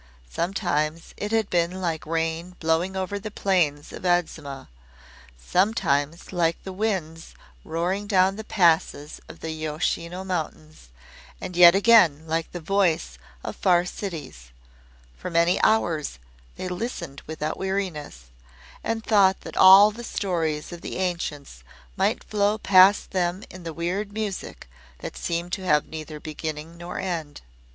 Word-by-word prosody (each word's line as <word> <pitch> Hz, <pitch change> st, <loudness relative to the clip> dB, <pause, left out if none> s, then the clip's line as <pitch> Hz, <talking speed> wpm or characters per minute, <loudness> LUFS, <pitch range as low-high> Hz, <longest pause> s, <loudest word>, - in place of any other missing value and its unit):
Sometimes 165 Hz, -3 st, -1 dB
it 210 Hz, -, -4 dB
had 225 Hz, -2 st, +2 dB
been 175 Hz, +1 st, +1 dB
like 165 Hz, -4 st, -3 dB
rain 165 Hz, +2 st, -2 dB
blowing 165 Hz, +4 st, 0 dB
over 190 Hz, +2 st, -2 dB
the 215 Hz, +2 st, -6 dB
plains 175 Hz, -8 st, 0 dB
of -, -, -9 dB
Adzuma, 160 Hz, -6 st, -1 dB, 0.7 s
sometimes 165 Hz, -, 0 dB
like 170 Hz, -2 st, +1 dB
the 190 Hz, -, -6 dB
winds 185 Hz, -6 st, -3 dB, 0.3 s
roaring 180 Hz, +5 st, -2 dB
down 190 Hz, -1 st, +3 dB
the 220 Hz, -, -6 dB
passes 165 Hz, -7 st, +1 dB
of -, -, -12 dB
the 160 Hz, -, -4 dB
Yoshino 160 Hz, +3 st, -3 dB
Mountains, 155 Hz, -, -5 dB, 0.5 s
and 180 Hz, -, -6 dB
yet 175 Hz, 0 st, +9 dB
again 195 Hz, -8 st, +5 dB
like 165 Hz, 0 st, -2 dB
the 175 Hz, -, -5 dB
voice 165 Hz, -, 0 dB, 0.2 s
of -, -, -5 dB
far 175 Hz, -2 st, +3 dB
cities. 160 Hz, -, -7 dB, 0.7 s
For -, -, -6 dB
many 170 Hz, +1 st, +2 dB
hours 165 Hz, -, +1 dB, 0.4 s
they -, -, -5 dB
listened 180 Hz, -, -5 dB
without 155 Hz, 0 st, -3 dB
weariness, 185 Hz, -, -3 dB, 0.6 s
and 225 Hz, 0 st, -2 dB
thought 195 Hz, -4 st, +4 dB
that -, -, -9 dB
all 195 Hz, +3 st, +9 dB
the 235 Hz, +3 st, -9 dB
stories 165 Hz, -9 st, -2 dB
of 175 Hz, -1 st, -8 dB
the -, -, -5 dB
ancients 155 Hz, -, -3 dB, 0.3 s
might -, -, 0 dB
flow 210 Hz, 0 st, +1 dB
past 195 Hz, -1 st, +5 dB
them 185 Hz, +1 st, -1 dB
in 185 Hz, -, -10 dB
the 165 Hz, -1 st, -5 dB
weird 180 Hz, +6 st, -3 dB
music 210 Hz, -, -5 dB, 0.3 s
that -, -, -7 dB
seemed 170 Hz, +1 st, -3 dB
to 190 Hz, -, -2 dB
have 150 Hz, -3 st, +3 dB
neither 155 Hz, -1 st, -8 dB
beginning 155 Hz, +1 st, -6 dB
nor 175 Hz, +1 st, -7 dB
end. 165 Hz, -6 st, -4 dB
175 Hz, 140 wpm, -25 LUFS, 160-190 Hz, 0.7 s, yet